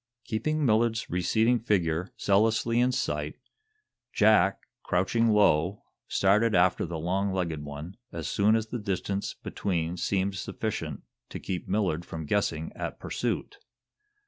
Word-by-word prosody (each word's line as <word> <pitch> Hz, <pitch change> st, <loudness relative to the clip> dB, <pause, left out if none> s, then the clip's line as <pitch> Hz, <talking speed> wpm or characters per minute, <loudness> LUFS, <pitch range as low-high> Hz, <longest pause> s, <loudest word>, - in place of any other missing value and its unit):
Keeping 150 Hz, +7 st, -1 dB
Millard's 115 Hz, 0 st, +2 dB
receding 110 Hz, +7 st, +2 dB
figure 90 Hz, -5 st, 0 dB
zealously 115 Hz, +3 st, +2 dB
in 125 Hz, +1 st, +3 dB
sight, -, -, -2 dB, 0.8 s
Jack, -, -, +4 dB, 0.2 s
crouching 115 Hz, 0 st, +1 dB
low, 100 Hz, -3 st, +3 dB, 0.2 s
started 105 Hz, +3 st, +3 dB
after 90 Hz, 0 st, +3 dB
the 85 Hz, 0 st, -4 dB
long 95 Hz, +5 st, 0 dB
legged 85 Hz, -5 st, -2 dB
one 75 Hz, +7 st, -8 dB
as 85 Hz, -2 st, -5 dB
soon 105 Hz, +2 st, +3 dB
as 110 Hz, 0 st, -1 dB
the 120 Hz, -, -3 dB
distance 100 Hz, -1 st, -2 dB
between 85 Hz, -2 st, -2 dB
seemed 95 Hz, +2 st, 0 dB
sufficient 95 Hz, -, -4 dB, 0.3 s
to -, -, -6 dB
keep 90 Hz, -2 st, -4 dB
Millard 95 Hz, -4 st, 0 dB
from 80 Hz, -2 st, -6 dB
guessing 80 Hz, -2 st, -1 dB
at -, -, -5 dB
pursuit. -, -, -3 dB
100 Hz, 130 wpm, -28 LUFS, 85-110 Hz, 0.8 s, Jack